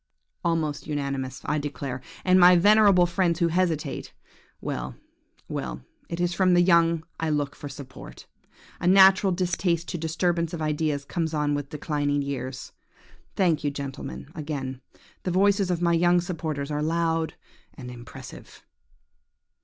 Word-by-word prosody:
"Almost 160 -4 -1
unanimous, 140 -3 -3
I 150 - 0
declare! 140 -3 -5 0.2
and 185 0 +5
my 180 0 +8
venerable 200 0 +6
friends 175 -1 +1
who 170 -1 +2
hesitate–well, 170 -3 -4 0.5
well–it 280 - -7
is 175 0 +1
from 185 0 +3
the 175 - +5
young 170 -2 +4 0.2
I 160 - -1
look 145 -2 -1
for 145 - -8
support. 140 -2 -11 0.5
A - - -1
natural 190 +1 +6
distaste 175 -1 0
to 175 - -3
disturbance 170 +1 0
of - - -7
ideas 150 -2 -1
comes 160 0 -2
on 150 -1 +1
with 145 -1 -3
declining 145 -1 -1
years. 130 -2 -5 0.6
Thank 170 -6 +2
you, 145 - +1
gentlemen, 135 - -7
again; 135 -4 -5 0.4
the - - -3
voices 195 +1 +3
of 175 -1 -1
my 170 0 +3
young 175 +1 +4
supporters 155 -5 -4
are 150 0 -1
loud 165 0 0 0.4
and 125 -3 -8
impressive. 120 -1 -11
165 Hz, 135 wpm, -26 LUFS, 145-175 Hz, 0.6 s, my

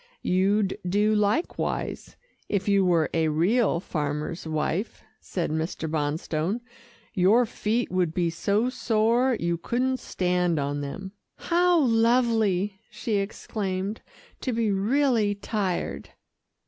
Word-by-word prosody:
"You'd 195 +2 +1
do 210 +3 +3
likewise, 210 - -1 0.3
if 200 -1 -1
you 200 -1 +4
were 170 -4 +2
a 160 -1 +2
real 175 +6 +2
farmer's 150 -1 -3
wife," 160 +6 -2 0.2
said 175 -4 -3
Mr. 160 +1 -2
Bonstone. 155 +6 -1 0.5
"Your 205 +7 +4
feet 225 +2 -1
would 180 -3 +1
be 170 0 0
so 205 +8 0
sore, 235 +1 +2
you 170 0 -1
couldn't 255 +6 0
stand 180 -2 0
on 145 0 -1
them." 190 +7 -6 0.3
"How 350 +1 +3
lovely!" 225 -5 +2
she 220 -3 -2
exclaimed, 195 0 -3 0.4
"to 255 - -2
be 225 -2 +1
really 220 +1 +2
tired." 200 -3 -3
200 Hz, 115 wpm, -26 LUFS, 170-225 Hz, 0.5 s, you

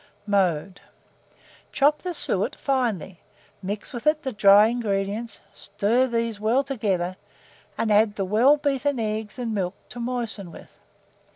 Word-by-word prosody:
] - - -37
Mode. 180 0 -1 0.9
Chop 295 +2 +2
the 360 -2 -4
suet - - 0
finely; 230 - -2 0.4
mix 205 +5 -4
with 240 +3 -5
it 305 0 +2
the 265 - -2
dry 205 -1 +6
ingredients; 215 -1 -2
stir 210 +6 0
these 230 -3 -2
well 230 +6 +2
together, 195 -9 -2 0.6
and 220 - 0
add 210 0 +4
the 195 - -2
well 235 +10 +4
beaten 285 -2 -1
eggs 215 0 -3
and 235 -3 -3
milk 190 -2 -2
to 245 - -8
moisten 235 -6 -4
with. - - -13
220 Hz, 145 wpm, -24 LUFS, 200-250 Hz, 0.9 s, dry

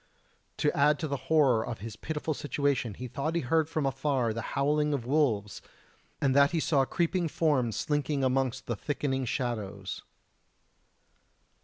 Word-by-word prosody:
To 150 +3 +1
add 150 0 +4
to 155 - -3
the 140 - -2
horror 135 -8 +4
of 120 -2 -5
his 110 0 -6
pitiful 155 +4 -3
situation, 140 -6 -1
he 125 - -6
thought 145 +7 -3
he 170 - +1
heard 160 +4 +1
from 155 -3 -1
afar 135 -3 0
the 115 - -3 0.2
howling 150 +1 +2
of 120 -4 -4
wolves, 120 -8 +1 0.6
and 135 -1 +2
that 140 0 +6
he 170 - 0
saw 140 -3 +2
creeping 170 +3 0
forms 145 -8 +1
slinking 145 -1 0
amongst 130 -1 0
the 120 - -2
thickening 135 +2 -2
shadows. 105 -6 -3
140 Hz, 155 wpm, -29 LUFS, 120-150 Hz, 0.6 s, that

